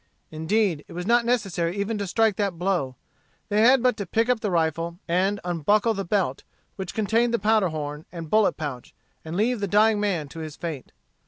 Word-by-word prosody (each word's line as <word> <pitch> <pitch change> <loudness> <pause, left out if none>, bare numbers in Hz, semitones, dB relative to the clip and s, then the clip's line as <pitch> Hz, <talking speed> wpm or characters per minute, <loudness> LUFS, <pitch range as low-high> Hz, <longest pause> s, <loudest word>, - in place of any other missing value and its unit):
Indeed, 160 +1 0
it - - -12
was 175 +1 -5
not 235 +2 +3
necessary 195 -7 0
even 205 +2 -2
to 200 - -3
strike 220 +2 +2
that 200 -4 -1
blow. 175 -8 -1 0.5
They 210 +1 +2
had 250 +2 +5
but 250 -2 +3
to 200 - -4
pick 225 +6 +1
up 250 -2 +2
the 215 - -2
rifle, 165 0 -1
and 190 +4 +1
unbuckle 205 +6 +1
the 195 -1 -3
belt 180 -8 0 0.3
which 190 -3 -6
contained 225 +2 +2
the - - +2
powder 215 -3 +2
horn 150 -1 -5
and 165 -2 -7
bullet 215 +5 +3
pouch, 140 -5 -6 0.3
and 160 +2 -5
leave 235 +3 +1
the 200 - -1
dying 210 +2 +4
man 185 -8 -1
to 165 - -9
his 155 -2 -6
fate. 160 -6 -6
195 Hz, 200 wpm, -25 LUFS, 165-220 Hz, 0.5 s, had